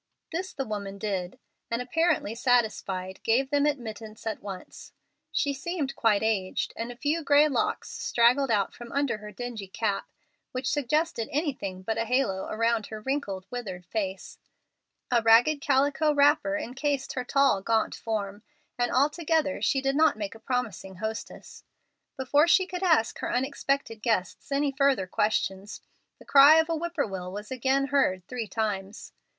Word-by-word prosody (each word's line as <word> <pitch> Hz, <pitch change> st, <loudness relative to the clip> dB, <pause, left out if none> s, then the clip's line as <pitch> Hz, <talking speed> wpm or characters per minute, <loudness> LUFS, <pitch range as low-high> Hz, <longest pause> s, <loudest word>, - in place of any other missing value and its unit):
This 370 Hz, +3 st, -3 dB
the 270 Hz, -, -4 dB
woman 200 Hz, -3 st, -5 dB
did, 190 Hz, -3 st, -3 dB, 0.3 s
and, 230 Hz, -, -1 dB
apparently 265 Hz, -2 st, +1 dB
satisfied, 215 Hz, -6 st, 0 dB
gave 265 Hz, +4 st, +1 dB
them 290 Hz, 0 st, +3 dB
admittance 220 Hz, -6 st, -5 dB
at 220 Hz, -, -3 dB
once. 195 Hz, -2 st, -9 dB, 0.4 s
She 285 Hz, -1 st, 0 dB
seemed 280 Hz, 0 st, -3 dB
quite 215 Hz, -2 st, +2 dB
aged, 200 Hz, -4 st, -1 dB
and 230 Hz, +1 st, -4 dB
a -, -, -9 dB
few 300 Hz, +6 st, -1 dB
gray 290 Hz, +1 st, +5 dB
locks 275 Hz, -, -1 dB
straggled 245 Hz, +3 st, +2 dB
out 205 Hz, -4 st, +1 dB
from 240 Hz, -1 st, -10 dB
under 275 Hz, -5 st, 0 dB
her 210 Hz, 0 st, -9 dB
dingy 225 Hz, -1 st, -6 dB
cap, 200 Hz, +1 st, -2 dB, 0.4 s
which 255 Hz, 0 st, -3 dB
suggested 290 Hz, -3 st, 0 dB
anything 255 Hz, -, -3 dB
but 225 Hz, +3 st, -2 dB
a 230 Hz, -, 0 dB
halo 225 Hz, -6 st, 0 dB
around 230 Hz, 0 st, 0 dB
her 215 Hz, -, -7 dB
wrinkled, 215 Hz, -7 st, -3 dB
withered 195 Hz, -8 st, -6 dB
face. 190 Hz, 0 st, -4 dB, 0.7 s
A 240 Hz, -1 st, +4 dB
ragged 235 Hz, +7 st, +5 dB
calico 285 Hz, +2 st, +2 dB
wrapper 295 Hz, +1 st, +3 dB
incased 280 Hz, 0 st, -2 dB
her 255 Hz, -, -2 dB
tall, 275 Hz, -6 st, +3 dB
gaunt 225 Hz, +2 st, +1 dB
form, 205 Hz, -2 st, -4 dB, 0.4 s
and 245 Hz, 0 st, +1 dB
altogether 300 Hz, +2 st, +1 dB
she 270 Hz, -, +2 dB
did 270 Hz, 0 st, 0 dB
not 315 Hz, -6 st, +4 dB
make 205 Hz, -2 st, -4 dB
a 225 Hz, -, -13 dB
promising 220 Hz, -6 st, -3 dB
hostess. 220 Hz, +3 st, -7 dB, 0.5 s
Before 285 Hz, +4 st, +3 dB
she 375 Hz, +2 st, +5 dB
could 360 Hz, 0 st, -6 dB
ask 320 Hz, -12 st, +2 dB
her -, -, -3 dB
unexpected 270 Hz, -3 st, -1 dB
guests 215 Hz, +2 st, -1 dB
any 280 Hz, 0 st, +1 dB
further 270 Hz, -7 st, +2 dB
questions, 200 Hz, +1 st, -1 dB, 0.4 s
the -, -, -17 dB
cry 285 Hz, +2 st, +8 dB
of 320 Hz, +1 st, +3 dB
a 330 Hz, -, +1 dB
whippoorwill 280 Hz, -, -3 dB
was 210 Hz, +3 st, -7 dB
again 265 Hz, +2 st, +1 dB
heard 185 Hz, -11 st, +1 dB
three 240 Hz, -3 st, -4 dB
times. 205 Hz, -1 st, -4 dB
245 Hz, 155 wpm, -27 LUFS, 210-285 Hz, 0.7 s, cry